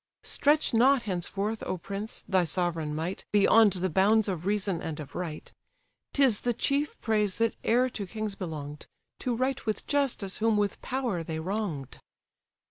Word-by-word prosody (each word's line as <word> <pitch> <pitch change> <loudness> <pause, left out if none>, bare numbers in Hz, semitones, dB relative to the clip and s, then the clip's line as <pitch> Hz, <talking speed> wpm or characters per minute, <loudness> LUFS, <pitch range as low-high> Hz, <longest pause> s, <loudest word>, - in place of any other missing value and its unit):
Stretch 295 -1 +2
not 255 +2 +5
henceforth, 200 +3 -2
O 185 - -2
prince! 200 +5 -6
thy 185 -2 +3
sovereign 165 -2 -1
might 165 +5 -3
Beyond 210 0 +6
the 185 0 0
bounds 210 +5 +4
of 180 -2 -3
reason 200 -4 0
and 155 -1 -5
of 150 - -8
right; 170 -4 -6 0.6
'Tis 265 -7 +4
the 240 -1 0
chief 285 +4 0
praise 210 -3 +1
that 230 0 +2
e'er 245 +3 +3
to 205 -5 -5
kings 215 +1 -4
belong'd, 150 -6 -6 0.3
To 245 -2 -1
right 260 +2 -1
with 215 - -1
justice 270 -9 0
whom 220 -1 +2
with 205 -1 -1
power 245 -9 -2
they 160 0 -4
wrong'd." 165 - -4
205 Hz, 160 wpm, -28 LUFS, 175-225 Hz, 0.6 s, Beyond